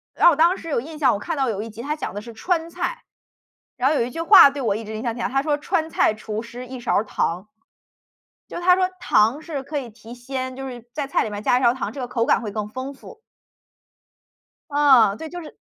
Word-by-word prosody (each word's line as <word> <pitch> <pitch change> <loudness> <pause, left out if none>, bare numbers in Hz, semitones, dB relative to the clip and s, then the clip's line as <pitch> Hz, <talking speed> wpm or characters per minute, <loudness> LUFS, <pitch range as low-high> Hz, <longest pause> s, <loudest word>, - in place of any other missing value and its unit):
然 - - +4
后 345 - +9
我 - - -1
当 335 +4 +4
时 330 - -9
有 285 - 0
印 310 +5 -9
象， 265 -5 +4
我 - - -3
看 330 +9 -4
到 270 -2 0
有 210 -2 -2
1 225 - -7
集， 220 +2 -9
它 295 +4 -2
讲 305 - -5
的 205 - -4
是 235 +2 -10
“川 335 +6 -1
菜”。 355 +8 -4 0.7
然 260 +2 +2
后 310 - +1
有 255 - +2
一 - - -5
句 330 - -4
话 330 -3 +9
对 280 0 -6
我 215 -5 0
一 225 - -5
直 220 0 -7
影 215 - -5
响 235 -2 -2
挺 240 - -4
大， - - 0
它 270 +1 +1
说： 295 0 0
“川 320 +1 -1
菜 265 - +2
厨 215 0 -5
师 240 +2 -9
1 255 0 -8
勺 240 - -1
儿 205 - +3
糖。” 185 -1 -2 1.0
就 - - -8
是 345 - -5
它 360 0 +5
说 370 0 +2
糖 240 -2 +2
是 305 -4 -5
可 290 +2 -4
以 250 -4 -6
提 225 +2 -12
鲜， 260 +1 -5
就 270 0 -6
是 240 -2 -9
在 290 -2 -2
菜 275 - +1
里 220 - -4
面 205 0 -6
加 245 - +3
1 - - -4
勺 240 -1 +4
糖， 260 - -4
这 280 - -7
个 250 - -4
口 235 -1 0
感 - - +3
会 220 -4 -5
更 210 0 -4
丰 260 +5 -6
富。 355 +11 -14 1.5
啊， 265 -8 +5
对， 320 - -7
就 350 +2 -7
是 310 - -12
260 Hz, 280 characters per minute, -22 LUFS, 230-305 Hz, 1.5 s, 后